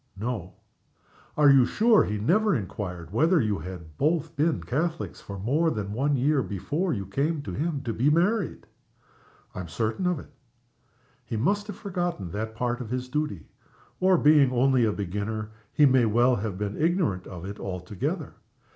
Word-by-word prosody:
"No." 105 -4 -4 0.8
"Are 145 -2 +7
you 135 -2 +7
sure 220 - +4
he 105 - -2
never 195 - +2
inquired 90 - -5
whether 165 - +4
you 105 - 0
had 85 -2 -9
both 160 +2 0
been 155 +3 +1
Catholics 160 +6 -2
for 100 - -8
more 140 - +1
than 105 -6 -3
one 140 +5 +1
year 140 +2 +2
before 145 - -2
you 100 -7 -2
came 140 - -1
to - - -6
him 150 -2 -2
to 115 -3 -2
be 125 +7 +2
married?" 180 +5 +1 0.9
"I - - -6
am 90 - -5
certain 110 - -1
of 180 -2 +1
it." - - -11 0.9
"He 115 - -4
must 205 - +1
have 205 -2 -7
forgotten 175 - -3
that 110 +3 -4
part 120 +1 -1
of 115 - -6
his 125 +1 -3
duty 150 - -2 0.5
or 185 0 +4
being 145 -4 +5
only 130 -1 +3
a 110 - +2
beginner, 105 +2 -4 0.2
he 150 - +5
may 130 -3 +5
well 120 +3 +3
have 100 -2 -3
been 105 +5 -3
ignorant 160 - +1
of 90 -2 -8
it 100 +1 -7
altogether. 90 +1 -4
125 Hz, 175 wpm, -26 LUFS, 105-160 Hz, 0.9 s, Are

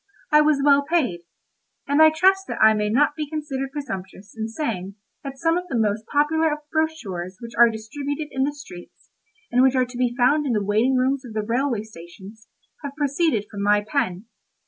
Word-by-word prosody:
I 300 0 +6
was 300 -2 +2
well 285 -1 +5
paid; 280 - 0 0.7
and 285 +2 +3
I 315 - +9
trust 380 +5 +2
that - - -5
I 220 0 +6
may 210 -1 -1
not 290 +6 +2
be 300 -2 -4
considered 285 -4 -4
presumptuous 200 -8 -7
in 220 0 -3
saying 215 - -4 0.3
that 275 -1 -7
some 330 +4 +1
of 360 - -10
the 260 - -2
most 215 0 -1
popular 310 +2 +1
of 300 - -2
the 300 - -23
brochures 205 - -3
which 235 -1 -9
are 235 0 +6
distributed 280 +7 -5
in 265 - -1
the 285 - 0
streets, 275 -12 -13 0.4
and 250 - +3
which 265 0 +4
are 255 -1 +3
to 245 0 -10
be 245 -1 0
found 285 +4 +3
in 250 - 0
the 210 -2 0
waiting 220 +6 +2
rooms 260 +2 +1
of 240 -4 -10
the 215 -1 -2
railway 235 0 -1
stations, 200 +2 -13 0.4
have 280 -1 -6
proceeded 285 -6 0
from 200 - -6
my 205 +1 +3
pen. 200 -8 -2
260 Hz, 205 wpm, -23 LUFS, 215-295 Hz, 0.7 s, I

